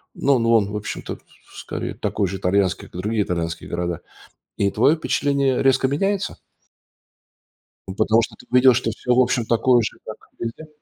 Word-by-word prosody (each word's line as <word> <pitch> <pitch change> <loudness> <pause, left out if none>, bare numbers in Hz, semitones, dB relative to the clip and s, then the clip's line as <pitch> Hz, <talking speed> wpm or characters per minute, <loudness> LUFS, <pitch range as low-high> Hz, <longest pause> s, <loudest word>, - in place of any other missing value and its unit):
Ну, 140 -1 +2 0.2
он, 105 -3 +3
в - - -5
общем-то, 105 -1 -5 0.3
с - - -11
скорее, - - -5
такой 100 -2 -1
же 95 +2 -4
итальянский, 95 0 0
как 90 - -9
другие 105 +2 0
итальянские 85 -2 -4
города. 85 -1 -3 0.6
И 100 - +1
твое 135 +10 +3
впечатление 140 -4 0
резко 135 0 +3
меняется? 195 +8 -1 1.5
Ну, 95 - -6
потому 110 +2 +3
что 115 - -5
ты - - -15
видел, 125 0 +6
что 115 -2 0
всё, 125 +3 -1
в 125 - +3
общем, 120 -2 +2
такое 120 +2 +3
же, 110 - -4
как 110 - -7 0.2
везде. 120 +7 -6
115 Hz, 170 wpm, -22 LUFS, 100-130 Hz, 1.5 s, видел